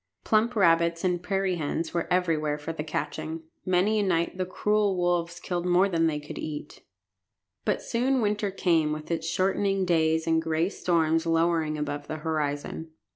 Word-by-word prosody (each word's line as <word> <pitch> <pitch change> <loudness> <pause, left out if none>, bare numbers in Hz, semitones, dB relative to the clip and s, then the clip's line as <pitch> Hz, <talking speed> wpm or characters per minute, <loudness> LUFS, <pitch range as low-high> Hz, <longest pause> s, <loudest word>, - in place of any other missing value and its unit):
Plump 225 +3 +2
rabbits 170 -3 +3
and 180 -2 +1
prairie 195 -1 0
hens 160 +2 -3
were 170 -1 -2
everywhere 160 -5 +1
for 150 +2 -5
the 150 - -4
catching. 160 +1 -4 0.2
Many 190 +4 +3
a - - +2
night 170 -3 0
the 185 -1 -2
cruel 210 0 +1
wolves 175 -1 0
killed 175 -1 -3
more 180 +2 +4
than 165 -3 +2
they 150 -2 -1
could 150 - -8
eat. 150 -1 -6 0.8
But - - 0
soon 255 +3 +1
winter 210 -2 0
came 165 -5 +1
with 155 +2 -6
its 165 -1 -1
shortening 195 +2 +1
days 160 -2 +2
and 160 -1 +2
gray 160 +2 0
storms 165 -3 +1
lowering 165 -2 +1
above 145 -1 -4
the 155 - -4
horizon. 155 0 -3
170 Hz, 170 wpm, -27 LUFS, 160-185 Hz, 0.8 s, more